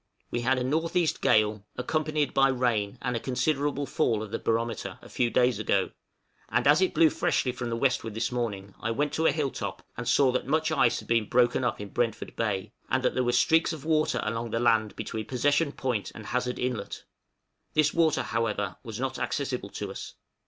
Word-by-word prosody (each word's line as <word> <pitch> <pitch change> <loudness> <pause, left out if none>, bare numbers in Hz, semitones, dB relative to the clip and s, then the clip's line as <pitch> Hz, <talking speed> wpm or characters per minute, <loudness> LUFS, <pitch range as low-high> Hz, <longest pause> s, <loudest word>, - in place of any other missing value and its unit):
We 120 - -1
had 130 +2 +2
a - - -1
N.E. 160 +5 +1
gale, 105 -1 +3
accompanied 155 +3 0
by 135 0 +5
rain 120 -5 0
and 125 -1 -1
a - - 0
considerable 140 +3 0
fall 115 -4 0
of 105 - -8
the - - -2
barometer, 115 -1 -2
a - - -14
few 120 -2 +1
days 125 -2 +2
ago; 100 -3 +1 0.6
and 120 +1 +1
as 145 +5 +6
it 185 - +1
blew 160 -2 +5
freshly 125 - +1
from 125 -1 -5
the 115 - -1
westward 115 -4 0
this 115 +2 -1
morning, 100 -5 -3
I 115 - -2
went 145 +6 0
to 160 0 +2
a - - +5
hill 145 -2 -1
top - - -5
and - - -3
saw 135 -3 +4
that 130 - -2
much 160 +1 +1
ice 120 -6 +3
had - - -8
been 115 -2 +1
broken 125 +1 +3
up 120 - -1
in 105 -1 -6
Brentford 115 -1 -2
Bay, 105 -2 -2 0.2
and 130 +1 +1
that - - +2
there 130 - +1
were 120 - +1
streaks 160 +7 +3
of 155 -2 -8
water 155 -5 +2
along 115 +2 -2
the 115 - -1
land 110 -3 +2
between 110 -1 -5
Possession 145 +4 +2
Point 120 -9 -2
and 110 - -9
Hazard 125 +2 -1
Inlet; 125 -5 -3 0.7
this 155 -1 +3
water, 165 -3 +2
however, 105 -4 -2
was 115 -1 -7
not 130 0 -2
accessible 130 -8 -2
to 100 0 -5
us. - - -8
125 Hz, 210 wpm, -28 LUFS, 115-140 Hz, 0.7 s, as